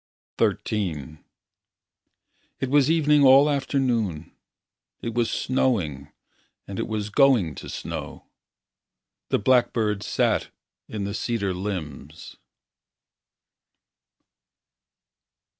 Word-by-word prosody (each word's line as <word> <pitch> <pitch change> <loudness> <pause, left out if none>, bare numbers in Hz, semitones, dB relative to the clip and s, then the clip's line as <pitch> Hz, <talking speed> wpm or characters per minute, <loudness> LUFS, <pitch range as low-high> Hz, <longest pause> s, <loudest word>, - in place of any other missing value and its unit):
XIII 80 -8 -1 1.4
It 130 -1 -3
was 145 -1 +4
evening 150 -3 +4
all 135 +2 +7
afternoon. 125 - -1 0.6
It 115 - -5
was 115 -1 +1
snowing 85 - -1 0.6
And 100 - -6
it - - -2
was 105 -1 -3
going 115 - +4
to - - -9
snow. - - -6 1.0
The - - +2
blackbird 110 -3 +2
sat - - 0 0.4
In 105 -2 -5
the 100 +1 -3
cedar 100 -3 -2
limbs. 80 -6 -6
110 Hz, 85 wpm, -24 LUFS, 90-130 Hz, 1.4 s, all